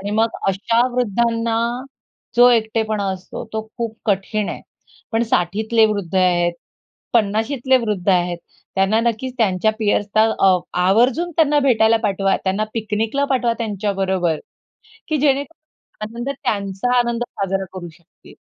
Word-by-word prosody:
आणि 200 Hz, +1 st, -4 dB
मग 220 Hz, +2 st, +2 dB, 0.2 s
अशा 230 Hz, +5 st, +2 dB
वृद्धांना 230 Hz, 0 st, 0 dB, 0.8 s
जो 245 Hz, +1 st, +8 dB
एकटेपणा 220 Hz, -2 st, 0 dB
असतो 185 Hz, +4 st, -8 dB
तो 220 Hz, 0 st, -2 dB, 0.2 s
खूप 230 Hz, -2 st, -3 dB
कठीण 205 Hz, +1 st, 0 dB
आहे. -, -, -5 dB, 0.5 s
पण 225 Hz, +1 st, +2 dB
60ठीतले 220 Hz, +3 st, +2 dB
वृद्ध 200 Hz, -4 st, -3 dB
आहेत, 175 Hz, -2 st, +3 dB, 0.6 s
50शीतले 235 Hz, +4 st, +2 dB
वृद्ध 210 Hz, -5 st, -3 dB
आहेत, 175 Hz, -1 st, +1 dB, 0.4 s
त्यांना 195 Hz, +3 st, +2 dB
नक्कीच 235 Hz, +2 st, -2 dB
त्यांच्या 215 Hz, -1 st, +2 dB
पिअर्सला 210 Hz, 0 st, +2 dB, 0.2 s
अ, 190 Hz, -2 st, +5 dB, 0.3 s
आवर्जून 250 Hz, -, +3 dB
त्यांना 300 Hz, -2 st, +4 dB
भेटायला 230 Hz, -4 st, +4 dB
पाठवा, 195 Hz, -2 st, +1 dB
त्यांना 195 Hz, +3 st, 0 dB
पिकनिकला 220 Hz, +5 st, -1 dB
पाठवा 245 Hz, -3 st, +2 dB
त्यांच्याबरोबर, 195 Hz, -6 st, -1 dB, 0.7 s
की 310 Hz, -2 st, 0 dB
जेणेकरून 285 Hz, -5 st, -3 dB
आनंद 240 Hz, +3 st, -4 dB
त्यांचा 200 Hz, +4 st, 0 dB
आनंद 235 Hz, 0 st, 0 dB
साजरा 195 Hz, 0 st, -2 dB
करू 175 Hz, -2 st, -7 dB
शकतील. 165 Hz, +1 st, -20 dB
220 Hz, 125 wpm, -20 LUFS, 195-235 Hz, 0.8 s, जो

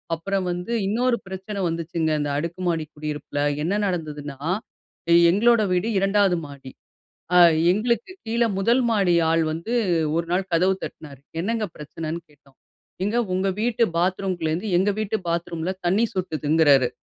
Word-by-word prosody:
அப்பறம் 195 Hz, +3 st, -2 dB
வந்து 180 Hz, +5 st, -4 dB, 0.2 s
இன்னொரு 240 Hz, +3 st, +1 dB
பிரச்சன 190 Hz, +2 st, -6 dB
வந்துச்சுங்க, 165 Hz, -1 st, -2 dB
இந்த 145 Hz, 0 st, -1 dB
அடுக்கு 170 Hz, +4 st, -4 dB
மாடி 165 Hz, -2 st, 0 dB
குடியிருப்புல 150 Hz, -1 st, -4 dB, 0.2 s
என்ன 195 Hz, +6 st, 0 dB
நடந்ததுன்னா, 150 Hz, -6 st, -4 dB, 0.9 s
எங்களோட 230 Hz, +3 st, +4 dB
வீடு 180 Hz, +5 st, 0 dB
2வது 195 Hz, -1 st, +3 dB
மாடி, 140 Hz, -2 st, -11 dB, 0.7 s
அ -, -, +8 dB, 0.3 s
எங்களுக்கு 235 Hz, -, -1 dB
கீழ 230 Hz, +1 st, 0 dB, 0.2 s
1 235 Hz, +6 st, +3 dB
மாடி 195 Hz, -6 st, +3 dB, 0.2 s
ஆள் 165 Hz, 0 st, +3 dB
வந்து 170 Hz, +8 st, -5 dB, 0.4 s
ஒரு 170 Hz, 0 st, 0 dB
நாள் 190 Hz, +1 st, 0 dB
கதவு 185 Hz, +3 st, +3 dB
தட்னாரு, 140 Hz, -4 st, -10 dB, 0.2 s
என்னங்க 225 Hz, +1 st, -1 dB
பிரச்சனைன்னு 160 Hz, +2 st, -5 dB
கேட்டோம்? 140 Hz, -2 st, -25 dB, 0.5 s
ஏங்க 220 Hz, +4 st, 0 dB, 0.2 s
உங்க 190 Hz, +1 st, 0 dB
வீட்டு 235 Hz, 0 st, +1 dB, 0.2 s
பாத்ரூமுக்குள்ளருந்து 180 Hz, 0 st, -1 dB
எங்க 195 Hz, +3 st, +2 dB
வீட்டு 215 Hz, 0 st, -1 dB
பாத்ரூம்ல 170 Hz, 0 st, -2 dB, 0.2 s
தண்ணி 210 Hz, +6 st, +3 dB
சொட்டுதுங்கிறாரு. 155 Hz, -6 st, +3 dB
180 Hz, 135 wpm, -23 LUFS, 160-205 Hz, 0.9 s, அ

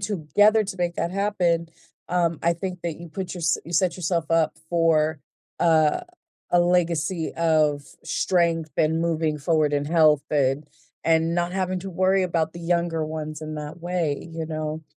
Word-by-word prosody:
together 205 Hz, +3 st, +3 dB
to 190 Hz, -, -6 dB
make 175 Hz, -1 st, -1 dB
that 170 Hz, -, -2 dB
happen, 180 Hz, -4 st, 0 dB, 0.4 s
um, 170 Hz, -3 st, 0 dB
I 170 Hz, 0 st, +2 dB
think 180 Hz, +1 st, -5 dB
that 170 Hz, -2 st, -3 dB
you 170 Hz, 0 st, -10 dB
put 185 Hz, +3 st, -5 dB
yourse 170 Hz, -3 st, +1 dB
you 170 Hz, -, -9 dB
set 175 Hz, +1 st, +2 dB
yourself 170 Hz, -2 st, -1 dB
up 165 Hz, -1 st, +2 dB
for, 160 Hz, -2 st, +2 dB, 0.4 s
uh, 160 Hz, -3 st, +4 dB, 0.5 s
a 175 Hz, -, +4 dB
legacy 175 Hz, -1 st, +1 dB
of 155 Hz, -3 st, +2 dB, 0.2 s
strength 165 Hz, -3 st, 0 dB
and 160 Hz, +1 st, +2 dB
moving 160 Hz, -2 st, 0 dB
forward 155 Hz, 0 st, +1 dB
in 145 Hz, 0 st, +1 dB
health 155 Hz, -2 st, +4 dB
and 140 Hz, 0 st, +1 dB, 0.4 s
and 165 Hz, +1 st, +2 dB
not 175 Hz, 0 st, 0 dB
having 185 Hz, -1 st, -1 dB
to 195 Hz, +2 st, -6 dB
worry 185 Hz, +2 st, +2 dB
about 165 Hz, -3 st, -1 dB
the 170 Hz, -, -9 dB
younger 170 Hz, -2 st, 0 dB
ones 155 Hz, -1 st, -5 dB
in 155 Hz, 0 st, -6 dB
that 150 Hz, +1 st, -7 dB
way, 170 Hz, -3 st, -2 dB
you 165 Hz, -1 st, -5 dB
know? 155 Hz, 0 st, -4 dB
165 Hz, 170 wpm, -24 LUFS, 155-175 Hz, 0.5 s, uh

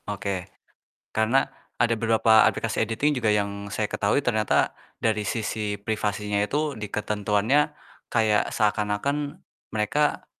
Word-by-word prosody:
Oke. 100 Hz, -3 st, -3 dB, 0.6 s
Karena 115 Hz, +5 st, +3 dB, 0.3 s
ada 120 Hz, -1 st, +3 dB
beberapa 110 Hz, -1 st, +4 dB
aplikasi 115 Hz, -1 st, -1 dB
editing 125 Hz, +6 st, +1 dB
juga 110 Hz, -, +2 dB
yang 100 Hz, -1 st, -1 dB
saya 105 Hz, +2 st, -1 dB
ketahui 105 Hz, +6 st, 0 dB
ternyata 110 Hz, -4 st, +2 dB, 0.2 s
dari 110 Hz, -2 st, 0 dB
sisi 105 Hz, -1 st, -2 dB
privasinya 105 Hz, 0 st, -1 dB
itu 145 Hz, +8 st, 0 dB
di 105 Hz, -4 st, -6 dB
ketentuannya 105 Hz, +7 st, +1 dB, 0.4 s
kayak 110 Hz, -2 st, +2 dB
seakan-akan 105 Hz, +8 st, 0 dB, 0.4 s
mereka 145 Hz, +8 st, +1 dB
110 Hz, 115 wpm, -25 LUFS, 105-115 Hz, 0.6 s, beberapa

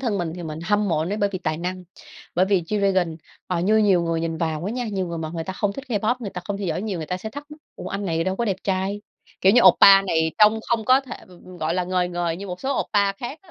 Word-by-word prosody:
thân 225 Hz, -7 st, -1 dB
mình 165 Hz, -2 st, -2 dB
thì 175 Hz, -, -7 dB
mình 155 Hz, -1 st, -6 dB
hâm 205 Hz, +1 st, +1 dB
mộ 160 Hz, -3 st, +1 dB
anh 160 Hz, +3 st, -1 dB
ấy -, -, -1 dB
bởi 205 Hz, -1 st, +1 dB
vì 185 Hz, -, -3 dB
tài 155 Hz, -3 st, -2 dB
năng. 180 Hz, +2 st, -5 dB, 0.5 s
Bởi 185 Hz, +2 st, +3 dB
vì 195 Hz, -2 st, +2 dB
G-Dragon, 190 Hz, -3 st, 0 dB, 0.3 s
ờ, 175 Hz, -2 st, -1 dB
như 210 Hz, +5 st, +3 dB
nhiều 195 Hz, -5 st, +4 dB
người 165 Hz, -1 st, -1 dB
nhìn 165 Hz, -1 st, -2 dB
vào 160 Hz, 0 st, -2 dB
á 215 Hz, -, -2 dB
nha, 245 Hz, 0 st, -3 dB
nhiều 190 Hz, -2 st, -1 dB
người 170 Hz, -1 st, -5 dB
mà 155 Hz, -1 st, -4 dB
người 165 Hz, -1 st, -3 dB
ta 190 Hz, -, -4 dB
không 200 Hz, +1 st, -1 dB
thích 270 Hz, +5 st, -8 dB
K-pop, 220 Hz, +1 st, +1 dB
người 210 Hz, -5 st, -6 dB
ta 180 Hz, -, -6 dB
không 205 Hz, -1 st, -3 dB
theo 200 Hz, -, -3 dB
dõi 165 Hz, +4 st, -2 dB
nhiều, 200 Hz, -5 st, -3 dB
người 155 Hz, -, -5 dB
ta 180 Hz, -, -2 dB
sẽ 220 Hz, +4 st, -7 dB
thắc 290 Hz, +3 st, -9 dB
mắc: 300 Hz, +1 st, -12 dB, 0.2 s
"Ủa -, -, -6 dB
anh 200 Hz, +1 st, -4 dB
này 165 Hz, 0 st, 0 dB
đâu 190 Hz, 0 st, -1 dB
có 235 Hz, -, -1 dB
đẹp 195 Hz, -4 st, -1 dB
trai?" 195 Hz, +1 st, -1 dB, 0.4 s
Kiểu 190 Hz, +1 st, +5 dB
như 240 Hz, -, +6 dB
oppa 195 Hz, +2 st, +8 dB
này 160 Hz, -4 st, +1 dB
trông 215 Hz, +1 st, +6 dB
không 230 Hz, -2 st, 0 dB
có 255 Hz, +3 st, +5 dB
thể, 265 Hz, -2 st, -8 dB
ừm, 180 Hz, -1 st, -17 dB
ừm 185 Hz, -1 st, -12 dB
gọi 155 Hz, +2 st, -1 dB
là, 180 Hz, -1 st, 0 dB
ngời 180 Hz, -1 st, 0 dB
ngời 175 Hz, -1 st, -2 dB
như 200 Hz, +2 st, -7 dB
một 180 Hz, -1 st, -6 dB
số 270 Hz, 0 st, -1 dB
oppa 200 Hz, -1 st, +1 dB
khác 245 Hz, +9 st, -7 dB
á, 360 Hz, -, -20 dB
190 Hz, 305 wpm, -23 LUFS, 170-210 Hz, 0.5 s, oppa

